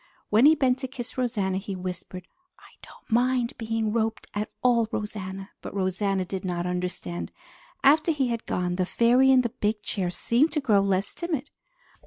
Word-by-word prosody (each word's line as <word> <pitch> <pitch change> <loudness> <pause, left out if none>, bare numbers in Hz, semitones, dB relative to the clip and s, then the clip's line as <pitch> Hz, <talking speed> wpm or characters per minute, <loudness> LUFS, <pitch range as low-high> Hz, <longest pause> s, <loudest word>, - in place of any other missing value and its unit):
When 225 +7 +6
he 315 - +7
bent 260 -3 +2
to 260 - -3
kiss 250 -2 -7
Rosanna, 205 -7 0
he 195 0 -5
whispered, 180 0 -6 0.3
"I - - -18
don't - - -15
mind 245 +1 +2
being 225 -1 -1
roped 225 -1 -1
at 210 +1 -2
all, 235 -3 +4
Rosanna!" 195 -2 -5
but - - -8
Rosanna 190 0 0
did 190 +1 -5
not 175 -2 -2
understand. 180 -1 -3 0.5
After 305 +4 +5
he 275 -5 0
had 230 -1 -3
gone, 180 0 -1
the 185 - +1
fairy 245 +5 +4
in 260 -1 +6
the 240 - -1
big 210 0 -2
chair 185 -4 -1
seemed 245 - +1
to 305 - +1
grow 215 -8 +3
less 195 0 0
timid. 310 -5 -3
220 Hz, 180 wpm, -26 LUFS, 190-250 Hz, 0.5 s, he